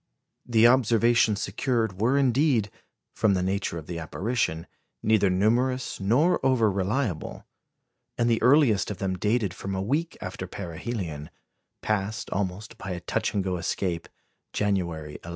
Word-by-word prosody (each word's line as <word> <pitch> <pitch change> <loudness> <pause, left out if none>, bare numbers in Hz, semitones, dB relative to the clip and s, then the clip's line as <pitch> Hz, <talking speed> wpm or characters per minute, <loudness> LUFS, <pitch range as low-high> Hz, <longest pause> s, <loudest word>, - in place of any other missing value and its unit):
The 115 -2 +4
observations 115 -3 +4
secured 110 -2 -1
were 125 +5 +3
indeed, 130 -5 +2 0.4
from 105 -3 +2
the 90 - 0
nature 95 -2 -1
of 80 - -7
the 85 +1 -5
apparition, 85 +1 -2 0.4
neither 105 -3 +3
numerous 120 +7 +1
nor 125 - +2
over 125 -5 +3
reliable; 100 - -2 0.7
and 120 - +2
the 115 -1 +2
earliest 130 -6 +4
of 105 - -4
them 95 -1 -2
dated 105 0 0
from 95 0 -5
a - - -2
week 150 +10 -1
after 95 0 -6
perihelion, 85 -4 -5 0.5
passed, 105 +1 -2
almost 100 +2 -3
by 95 - -6
a 90 - -5
touch 90 - -2
and 100 - +1
go 95 -1 -1
escape, 85 -1 -2 0.4
January 85 -7 -2
11. 85 - -8
105 Hz, 145 wpm, -26 LUFS, 95-120 Hz, 0.7 s, The